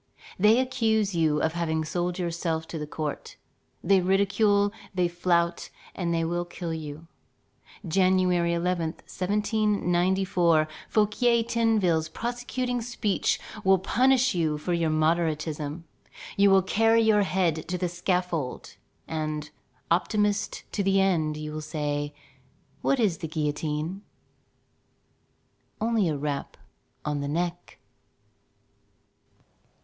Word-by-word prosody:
They 215 +5 +5
accuse 220 -5 +1
you 155 -3 +1
of 160 - +1
having 160 -2 -1
sold 175 +2 -2
yourself 165 -2 -2
to 165 - -5
the 150 - -5
court. 150 -1 -5 0.5
They 195 -1 +4
ridicule, 200 +2 +2 0.2
they 180 -1 +2
flout, 170 0 0 0.2
and 175 -2 -2
they 165 -1 +1
will 175 +1 -1
kill 175 -1 -5
you. 155 0 -7 0.8
January 180 -1 +3
11, 170 -2 -1
1794, 190 -4 +1 0.2
Fouquier 230 +2 +2
Tinville's 215 -9 +1
prosecuting 245 +3 -3
speech 225 -4 0 0.2
will 190 0 +5
punish 255 +6 +3
you 160 -4 0
for 175 +4 -2
your 170 -2 +1
moderatism. 155 -1 0 0.5
You 200 0 +5
will 195 -1 +5
carry 225 +3 +3
your 215 -2 +4
head 180 -5 0
to 180 +1 -2
the 180 0 -1
scaffold, 175 -5 -2 0.3
and, 155 -1 -3 0.4
optimist 205 +4 +1
to 205 - -1
the 195 0 +3
end, 160 -6 +1
you 155 0 -5
will 155 0 -5
say: 145 -1 -3 0.7
"What 275 - +1
is 200 -8 +1
the 160 - -4
guillotine? 155 +3 -2 1.8
only 220 -4 +1
a 150 - -1
rap 145 -1 -4 0.5
on 150 -1 -1
the 140 - -3
neck." 175 +3 -3
175 Hz, 115 wpm, -26 LUFS, 160-200 Hz, 1.8 s, They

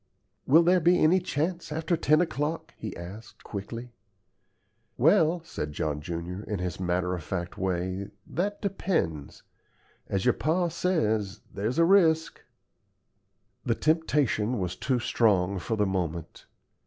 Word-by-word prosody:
"Will 160 +5 +7
there 180 +2 +4
be 175 +2 +4
any 175 +3 +4
chance 170 0 -2
after 160 +3 0
ten 155 0 +3
o'clock?" 160 0 -2
he 110 -3 -7
asked, 95 +6 -10
quickly. 115 +4 -7 1.0
"Well," 165 - +4
said 75 - -5
John 75 0 -2
junior, 85 +4 -5
in 105 - -3
his 90 -1 -4
matter 90 0 0
of 90 - -3
fact 85 +2 -4
way, 95 +1 -2 0.2
"that 205 +5 -3
depends. 165 - -2 0.6
As 95 -1 -1
your - - +5
pa 170 +4 +1
says, 110 - 0
there's 110 +7 -2
a 165 - +5
risk." 165 -4 +3 1.2
The 115 - +1
temptation 135 - +1
was 90 -3 -2
too 130 -2 0
strong 100 -5 +2
for 110 +6 -2
the 105 - +2
moment. 85 -4 -3
115 Hz, 135 wpm, -28 LUFS, -, 1.2 s, Will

